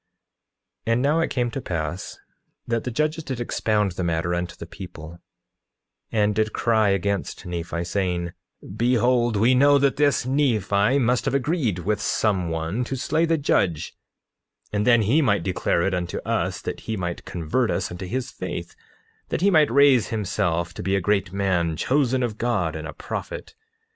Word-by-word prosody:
9:16 115 - +3
And 120 - +1
now 150 +4 +3
it 165 - +1
came 120 -2 -1
to 135 - -4
pass 85 -2 -4 0.5
that 115 -1 -1
the - - -1
judges 155 +6 -1
did 130 -4 -4
expound 105 -4 0
the 90 +1 -4
matter 85 +1 0
unto 90 0 -3
the - - -8
people, 85 -2 -10 0.9
and 105 -1 +2
did 110 0 0
cry 110 -3 +2
out 100 - +3
against 100 +1 -2
Nephi, 85 -1 -3
saying: 90 -1 -1 0.4
Behold, 120 0 +2
we 115 +5 +4
know 140 +2 +6
that 140 0 +2
this 145 -4 +2
Nephi 125 -4 +2
must 125 -2 +1
have - - 0
agreed 140 - 0
with 105 +1 0
some 95 -6 +1
one 80 +8 -2
to 135 - -3
slay 150 +5 +1
the 165 0 +2
judge, 95 - 0 0.8
and 105 +2 0
then 120 -2 +5
he 130 +10 +3
might 100 -8 +2
declare 90 -2 0
it 95 - 0
unto 90 -1 -2
us, - - -1
that - - -4
he 110 - -1
might 85 -2 -4
convert 90 +9 -1
us - - -1
unto 90 +1 -6
his 130 +6 -3
faith, - - -6 0.5
that - - -2
he 200 +2 +4
might 155 -4 +5
raise 135 -2 +5
himself 85 -5 -1
to - - -7
be 95 +2 0
a - - +2
great 95 0 0
man, 90 -5 0
chosen 130 - +1
of 110 -3 -3
God, 120 0 0
and - - -5
a - - -7
prophet. - - -6
110 Hz, 180 wpm, -24 LUFS, 90-130 Hz, 0.9 s, know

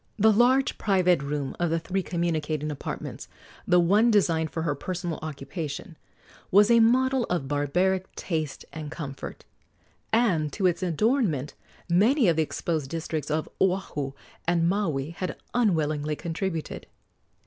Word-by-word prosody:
The 220 +1 +5
large 255 +5 +3
private 180 -6 +3
room 140 -1 -3
of 175 -1 +1
the 165 - +1
three 185 +4 -2
communicating 155 -4 -1
apartments 145 - -6 0.4
the 180 0 +5
one 205 +7 +4
designed 165 -7 +2
for 160 - -3
her 150 -3 0
personal 175 +3 -4
occupation 155 +2 -6 0.5
was 205 +4 +5
a 235 - +7
model 255 +2 +3
of 170 -7 -2
barbaric 180 +7 0
taste 155 -5 -3
and 155 -1 -6
comfort, 145 -4 -7 0.7
and 185 -10 +2
to 195 - -1
its 180 0 +2
adornment 185 - +1 0.3
many 220 - +4
of 170 - +4
the - - +4
exposed 155 -2 -2
districts 160 -1 -3
of 155 +1 -1
Oahu 180 -8 0 0.3
and 170 -1 +3
Maui 165 -7 0
had 180 +2 -4 0.2
unwillingly 155 -9 +1
contributed. 165 0 -4
170 Hz, 135 wpm, -26 LUFS, 155-195 Hz, 0.7 s, a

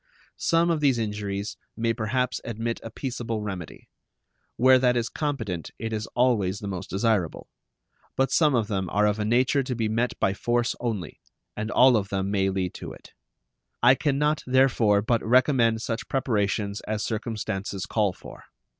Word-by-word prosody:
Some 170 +1 +2
of 165 - 0
these 140 -4 +3
injuries 105 -2 -3 0.2
may 115 0 +1
perhaps 125 +3 -1
admit 115 0 -3
a 115 - -7
peaceable 115 -3 -4
remedy. 95 -5 -7 0.7
Where 130 +1 +6
that 125 -1 +3
is 120 0 -1
competent 115 - -3
it 110 0 -4
is 110 0 -3
always 115 -6 +2
the 100 - -7
most 95 -1 -5
desirable. 100 -4 0 0.7
But 135 0 +1
some 150 -5 +4
of 115 -3 +1
them 95 -4 -2
are 105 +4 +2
of 105 +1 +1
a 105 - 0
nature 125 +5 +2
to 130 -1 -3
be 115 -2 0
met 115 +3 -1
by 95 - +2
force 120 +3 0
only, 110 -9 -4 0.4
and 110 +1 -3
all 125 +1 +6
of 100 -3 0
them 95 0 -2
may 95 -1 +1
lead 95 -2 -2
to - - -8
it. - - -14 0.7
I 125 +2 +8
can 140 0 0
not, 150 +1 +1
therefore, 120 -6 +3
but 115 +1 +1
recommend 120 -2 +3
such 120 +2 -3
preparations 105 -5 -1
as 110 0 -2
circumstances 105 -3 -3
call 105 -3 +1
for. - - -13
115 Hz, 170 wpm, -26 LUFS, 100-125 Hz, 0.7 s, I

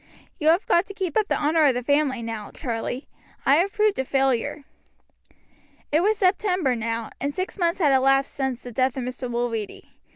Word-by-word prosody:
You 310 - -1
have 335 +5 +4
got 345 +3 +2
to 405 - -9
keep 370 -6 -3
up 430 -2 +2
the - - +1
honor 310 +2 +2
of 265 -3 +4
the 245 - -2
family 285 -2 +1
now, 225 -2 -5
Charlie; 245 0 -4 0.4
I 280 - +5
have 375 +4 +1
proved 425 -6 +1
a - - +2
failure." 270 +1 0 1.3
It 305 - +4
was 425 +3 +2
September 365 -7 +1
now, 230 0 -3
and 280 - -1
six 370 +6 -4
months 340 -1 +1
had 300 -6 +3
elapsed 270 +1 +3
since 265 -3 -3
the 245 - -8
death 255 +3 0
of 260 - -2
Mr. 250 0 -5
Mulready. 235 -3 -3
270 Hz, 195 wpm, -24 LUFS, 245-340 Hz, 1.3 s, I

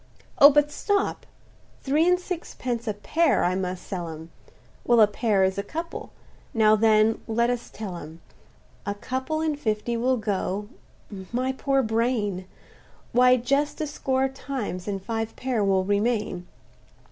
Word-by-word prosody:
"Oh! 285 - +11
but 295 0 +3
stop—three 330 -5 -2
and 360 0 +4
sixpence 255 -10 -4
a 210 - -1
pair 315 +10 +2
I 180 - +2
must 185 -1 -3
sell 175 -4 -4
'em; 160 +1 -9 0.5
Well, 240 -1 +4
a 215 - +9
pair 210 -1 +1
is 190 +1 +1
a - - -2
couple—now 225 -6 -1
then 220 0 +3
let 235 +2 +1
us 245 -1 -4
tell 205 -4 -6
'em; 160 0 -10 0.6
A 205 - -3
couple 260 +8 -3
in 315 -2 0
fifty 220 -2 -1
will 250 +2 +1
go—(my 205 +3 -4
poor 270 0 +1
brain!) 220 -4 0 0.7
Why 250 +1 +5
just 280 +4 0
a 310 - -1
score 265 -2 0
times, 260 -9 -5
and 200 -1 -2
five 225 -1 -3
pair 250 -5 -1
will 190 -1 +2
remain. 205 -2 -1
230 Hz, 140 wpm, -25 LUFS, 200-265 Hz, 0.7 s, Oh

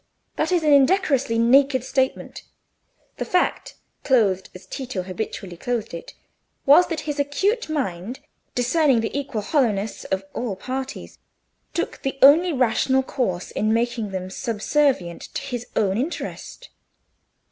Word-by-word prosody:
That - - -1
is 350 -3 +2
an 300 -1 +4
indecorously 275 -5 +3
naked 260 +2 +4
statement; 265 0 -1 0.8
the - - -2
fact, 360 - 0 0.3
clothed 205 -8 +2
as 185 +1 -11
Tito 245 -3 -5
habitually 185 -1 -5
clothed 225 +3 -3
it, 170 - -8 0.5
was 305 +6 +7
that 325 -3 -3
his 295 -1 -4
acute 385 - 0
mind, 245 - -3 0.4
discerning 255 0 +3
the 225 - -4
equal 275 -6 -2
hollowness 215 -6 0
of 190 0 -2
all 230 -5 -3
parties, 260 +6 -6 0.6
took 340 - -3
the 270 0 -3
only 325 +6 +7
rational 260 0 +2
course 190 -10 -2
in 215 +1 +1
making 230 -2 -1
them 185 -1 -5
subservient 230 - 0
to - - -2
his 245 -4 -5
own 200 0 +1
interest. 345 - -5
255 Hz, 135 wpm, -23 LUFS, 210-285 Hz, 0.8 s, was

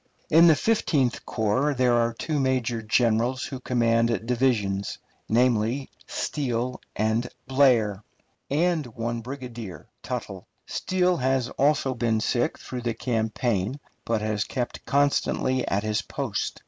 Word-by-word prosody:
In 165 +2 +8
the 160 - +7
Fifteenth 145 - +1
Corps 125 +7 +1
there 125 -1 +3
are 115 0 +3
two 150 +4 -2
major 125 -3 0
generals 120 +3 +1
who 130 - -6
command 115 -3 +1
divisions 115 -6 0 0.3
namely, 120 +2 +2 0.2
Steele 125 -3 -2
and 110 +3 0 0.2
Blair 120 -7 +3 0.5
and 160 0 +1
one 115 0 -2
brigadier, 120 - -7 0.2
Tuttle. - - -5 0.2
Steele 180 -1 +1
has 130 -1 +1
also 140 -2 +1
been 115 -2 0
sick 120 +3 0
through 125 -1 -6
the 120 -1 -2
campaign, 115 0 -1 0.2
but 115 -2 0
has 105 -1 0
kept 125 -2 -4
constantly 140 -2 +1
at 100 +1 0
his 110 -1 0
post. - - -3
120 Hz, 125 wpm, -26 LUFS, 110-135 Hz, 0.5 s, In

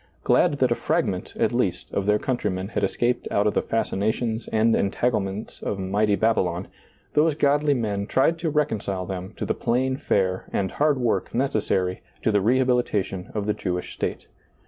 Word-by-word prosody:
Glad - - +4
that - - +2
a - - +6
fragment, - - -1
at - - +1
least, - - -1
of 100 0 -1
their 105 0 +4
countrymen 100 -6 -2
had - - -2
escaped 120 0 0
out 100 - +1
of 105 - +2
the - - +2
fasci 115 - -1
nations 110 +3 -1
and 110 +1 +3
entanglements 100 -1 -1
of 100 - -2
mighty 100 +2 +1
Babylon, 95 -5 0 0.4
those 150 0 +3
godly 145 0 +3
men 105 -4 -2
tried 165 +8 +2
to 165 -1 -1
reconcile 105 -11 -1
them 95 +1 -6
to - - -3
the - - 0
plain 130 +2 0
fare 95 -9 0
and 95 -2 -1
hard 150 -1 +2
work 120 -2 -1
necessary 105 -8 0 0.2
to 110 - +3
the 105 - +3
rehabil 125 +3 +3
itation 95 -5 -3
of 105 -1 -1
the 105 - +1
Jewish 90 -3 -3
state. - - -3
110 Hz, 180 wpm, -24 LUFS, 95-125 Hz, 0.4 s, a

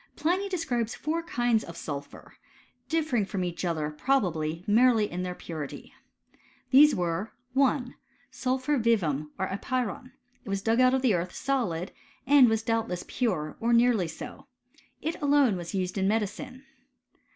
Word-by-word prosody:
Pliny 370 +6 0
describes 245 - -1
four 320 +3 -2
kinds 240 -10 +1
of 170 -1 -9
sul 140 -2 -4
phur, 145 - -15 0.6
differing 310 -9 +1
from 195 -1 -3
each 175 0 -4
other, 160 -4 -1
probably, 165 - 0
merely 225 0 +4
in 180 -1 -5
their 180 0 -4
purity. 155 -6 -7 0.8
These 290 +3 +7
were 180 +4 -2 0.2
1. 265 -1 +2 0.4
Sulphur 260 +2 0
vivum, 165 - +1
or 190 - 0
apyron. 250 +3 -3 0.3
It 220 - -10
was 195 0 -2
dug 225 +3 +2
out 255 +1 +5
of 265 - -1
the 245 -5 +4
earth 175 0 -2
solid, 195 -11 -1 0.3
and 270 -2 +7
was 220 0 0
doubtless 225 -6 -1
pure, 180 -12 -2
or 235 +1 +1
nearly 235 -6 +4
so. 275 - -9 0.6
It 320 +3 -3
alone 285 -6 +4
was 175 +2 -6
used 185 0 -2
in 190 - +1
medicine. 225 +5 -2
225 Hz, 150 wpm, -28 LUFS, 180-260 Hz, 0.8 s, These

